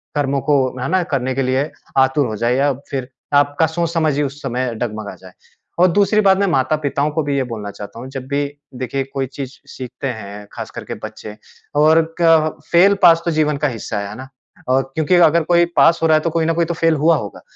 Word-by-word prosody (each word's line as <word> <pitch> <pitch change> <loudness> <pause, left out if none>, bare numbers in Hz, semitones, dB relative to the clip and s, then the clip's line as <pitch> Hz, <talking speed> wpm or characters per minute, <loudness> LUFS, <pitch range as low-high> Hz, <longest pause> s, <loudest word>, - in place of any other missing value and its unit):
कर्मों 140 -1 0
को 145 +3 +2 0.2
है 130 - -2
ना? 185 0 +2
करने 130 -6 -2
के 135 - 0
लिए 130 +4 0 0.3
आतुर 135 +1 +3
हो 110 - -4
जाए 120 +4 0
या 140 +2 +2 0.2
फ़िर 130 -2 -4 0.2
आपका 145 +2 +3
सोच-समझ 165 -2 0
ही 150 - +1
उस 140 +1 -5
समय 125 -2 -2
डगमगा 110 -2 -5
जाए। 95 -1 -14 0.5
और 180 - +6
दूसरी 205 +3 +3
बात 195 -2 +4
मैं 200 - +1
माता-पिताओं 145 -1 0
को 160 0 0
भी 140 -1 -1
ये 135 - +1
बोलना 105 -2 -6
चाहता 100 +3 -10
हूँ, 130 - -8
जब 135 -1 -7
भी 140 +1 0 0.3
देखिए 130 +2 -3
कोई 135 -1 -1
चीज़ 135 +1 -8
सीखते 130 +1 -6
हैं 105 -4 -7
ख़ास - - -6
करके - - -7
बच्चे 105 -1 -8 0.5
और 160 +1 +4
क 160 -2 +4
फेल 195 +4 +5
पास 165 -1 +7
तो 170 - +1
जीवन 150 -2 +1
का 150 +1 0
हिस्सा 115 -3 -4
है, 100 - -5
है 105 - -8
ना? 130 - -9 0.4
और 130 +1 +3
क्योंकि 160 +3 +2
अगर 170 -1 +5
कोई 175 +1 +4
पास 165 - +5
हो - - +4
रहा 155 -1 +5
है - - -1
तो 170 - 0
कोई 165 0 0
ना 165 - +1
कोई 170 +1 +1
तो 170 - -3
फेल 165 -1 +2
हुआ 160 +3 +3
होगा। 100 - -7
145 Hz, 230 wpm, -18 LUFS, 130-165 Hz, 0.5 s, पास